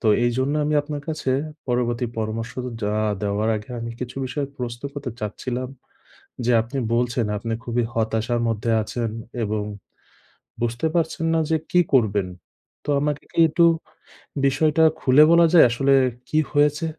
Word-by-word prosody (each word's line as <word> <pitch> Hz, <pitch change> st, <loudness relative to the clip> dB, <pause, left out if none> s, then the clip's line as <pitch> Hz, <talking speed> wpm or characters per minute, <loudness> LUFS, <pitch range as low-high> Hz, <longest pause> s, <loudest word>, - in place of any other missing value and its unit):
তো -, -, -2 dB, 0.2 s
এইজন্য 130 Hz, +4 st, 0 dB
আমি 150 Hz, -, 0 dB
আপনার 145 Hz, 0 st, -5 dB
কাছে 155 Hz, -4 st, -2 dB, 0.4 s
পরবর্তী 120 Hz, -1 st, 0 dB
পরামর্শ 110 Hz, +1 st, -3 dB
তো 125 Hz, -, -4 dB
যা 105 Hz, 0 st, 0 dB, 0.3 s
দেওয়ার 105 Hz, +2 st, 0 dB
আগে 105 Hz, +3 st, -9 dB
আমি 115 Hz, 0 st, -4 dB
কিছু 125 Hz, 0 st, -6 dB
বিষয়ে 140 Hz, +2 st, -3 dB
প্রশ্ন 120 Hz, -1 st, -5 dB
করতে 145 Hz, -3 st, -5 dB
চাচ্ছিলাম, 125 Hz, +4 st, -4 dB, 0.8 s
যে 125 Hz, -, +3 dB
আপনি 120 Hz, +5 st, -6 dB, 0.2 s
বলছেন 120 Hz, 0 st, +1 dB
আপনি 115 Hz, +2 st, -3 dB
খুবই 120 Hz, 0 st, 0 dB
হতাশার 115 Hz, +1 st, 0 dB
মধ্যে 115 Hz, 0 st, -1 dB
আছেন 115 Hz, +2 st, -3 dB, 0.3 s
এবং 105 Hz, 0 st, -1 dB, 1.0 s
বুঝতে 120 Hz, +6 st, 0 dB
পারছেন 165 Hz, -1 st, 0 dB
না 165 Hz, -, +3 dB
যে 160 Hz, -, +3 dB
কি 180 Hz, -, +4 dB
করবেন। 105 Hz, -7 st, +3 dB, 0.6 s
তো -, -, -7 dB
আমাকে 150 Hz, 0 st, -2 dB
কি -, -, -1 dB
একটু 170 Hz, +2 st, +3 dB, 0.8 s
বিষয়টা 150 Hz, +3 st, +2 dB, 0.2 s
খুলে 130 Hz, +3 st, +6 dB
বলা 170 Hz, 0 st, +6 dB
যায় 175 Hz, -, +8 dB
আসলে 135 Hz, +3 st, +2 dB, 0.4 s
কী 155 Hz, -, +1 dB
হয়েছে? 150 Hz, +2 st, +2 dB
125 Hz, 150 wpm, -23 LUFS, 115-145 Hz, 1.0 s, যায়